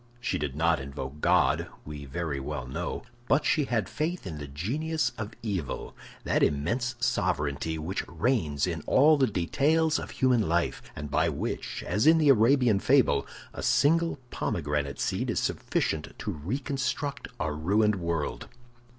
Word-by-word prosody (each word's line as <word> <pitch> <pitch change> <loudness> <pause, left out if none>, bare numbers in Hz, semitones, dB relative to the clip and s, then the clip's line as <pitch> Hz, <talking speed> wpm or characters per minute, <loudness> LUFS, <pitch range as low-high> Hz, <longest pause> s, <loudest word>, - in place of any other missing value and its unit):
She 125 +1 -1
did 70 -2 -3
not 80 0 +2
invoke 70 +1 -7
God, - - +3 0.2
we 75 -1 -7
very 70 +1 -3
well 65 -1 -4
know, 80 +8 -4 0.2
but 145 +2 +3
she 150 - +2
had 120 -4 0
faith 165 +1 -3
in 80 -5 -5
the 75 - -6
genius 145 - -1
of 110 -1 -6
evil—that 95 - -3
immense 120 - +1
sovereignty 75 - 0
which 80 +5 -3
reigns 80 - 0
in 85 -3 -3
all 150 +4 +6
the 135 -3 +3
details 155 - +2
of - - -6
human 125 -8 +2
life, 85 0 0
and 75 -1 -6
by - - +2
which, - - -4
as 105 - +1
in 165 +1 +7
the 155 -3 +4
Arabian 120 -3 +5
fable, - - +3 0.3
a - - -6
single 165 +3 +3
pomegranate 75 -1 -2
seed - - -1
is - - +1
sufficient 75 -1 -2
to - - -3
reconstruct 135 - -3
a 80 -4 -1
ruined 100 +7 +2
world. 85 -4 -2
95 Hz, 150 wpm, -28 LUFS, -, 0.3 s, in